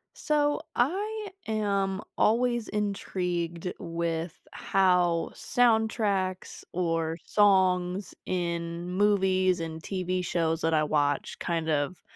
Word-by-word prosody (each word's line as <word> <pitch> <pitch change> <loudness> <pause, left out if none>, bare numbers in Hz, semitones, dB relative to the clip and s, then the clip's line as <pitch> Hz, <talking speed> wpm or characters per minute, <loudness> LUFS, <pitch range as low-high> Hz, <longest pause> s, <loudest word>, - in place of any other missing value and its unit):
So, 295 -1 +1 0.2
I 410 - 0 0.2
am 200 -3 0 0.2
always 240 +1 +2
intrigued 180 -4 -2
with 165 0 -3
how 180 -3 +2
soundtracks 220 -6 +1
or 165 -2 0
songs 185 -2 +2
in 170 -1 -2
movies 185 -2 +2
and 160 -1 -5
TV 185 -1 -2
shows 165 -2 0
that 165 0 +1
I 155 -1 +3
watch 145 -1 0
kind 165 -2 -1
of, 150 +3 -1
185 Hz, 100 wpm, -28 LUFS, 170-205 Hz, 0.2 s, I